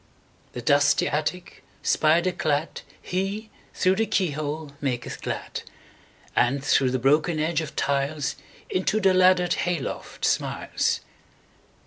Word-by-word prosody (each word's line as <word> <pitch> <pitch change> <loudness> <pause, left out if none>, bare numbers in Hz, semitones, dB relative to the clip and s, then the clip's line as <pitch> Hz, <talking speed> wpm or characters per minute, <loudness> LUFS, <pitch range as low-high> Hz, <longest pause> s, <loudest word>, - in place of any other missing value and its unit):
The 120 - -6
dusty 145 +2 +4
attic 155 +4 -3 0.2
spider 170 +4 +3
cladHe, 185 +7 -3 0.3
through 185 +1 +3
the 225 - +1
keyhole, 155 -3 -1
maketh 125 -4 -3
glad; - - -4 0.7
And 135 +3 +2
through 135 -2 +3
the 130 - 0
broken 150 +6 +2
edge 160 +1 +1
of 155 -1 -7
tiles, 140 +1 0 0.3
Into 190 +3 0
the 190 -2 +4
laddered 185 -1 +4
hay 175 -1 0
loft - - -5
smiles. - - 0
155 Hz, 115 wpm, -25 LUFS, 140-180 Hz, 0.7 s, dusty